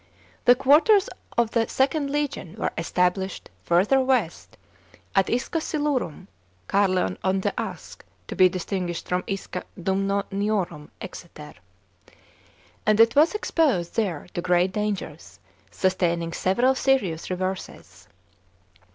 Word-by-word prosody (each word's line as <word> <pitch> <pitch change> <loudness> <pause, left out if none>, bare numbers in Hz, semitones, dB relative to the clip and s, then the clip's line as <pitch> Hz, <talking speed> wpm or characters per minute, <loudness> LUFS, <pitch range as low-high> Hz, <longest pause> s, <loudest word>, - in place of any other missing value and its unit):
The 245 - +7
quarters 310 - +4 0.3
of 235 -2 +2
the 230 -1 +1
Ilnd 280 +2 0
legion 285 - -3
were 220 - -2
established 180 +3 -1
further 190 +10 +3
west, 255 -10 -1 0.6
at 195 -1 +3
Isca 255 +7 -1
Silurum 295 - -2 0.4
(Ca< 200 - +3
rleon 180 - 0
on 190 0 +1
the 200 +1 -1
Usk, 195 -7 -6 0.2
to - - -6
be 185 0 +6
distinguished 180 -1 -4
from 180 0 -1
Isca 195 -2 -4 0.2
Durnnoniorum, 195 -3 -1
Exeter), 155 -5 -10 1.3
and 215 0 +2
it 230 0 +6
was 310 +7 +4
exposed 285 - 0
there 190 -9 -1
to 175 - -2
great 180 +1 +2
dangers, 200 -7 -4 0.3
sustaining 170 - 0
several 240 +8 +2
s^iious 260 -12 0
reverses. 180 - -5
195 Hz, 115 wpm, -24 LUFS, 180-245 Hz, 1.3 s, The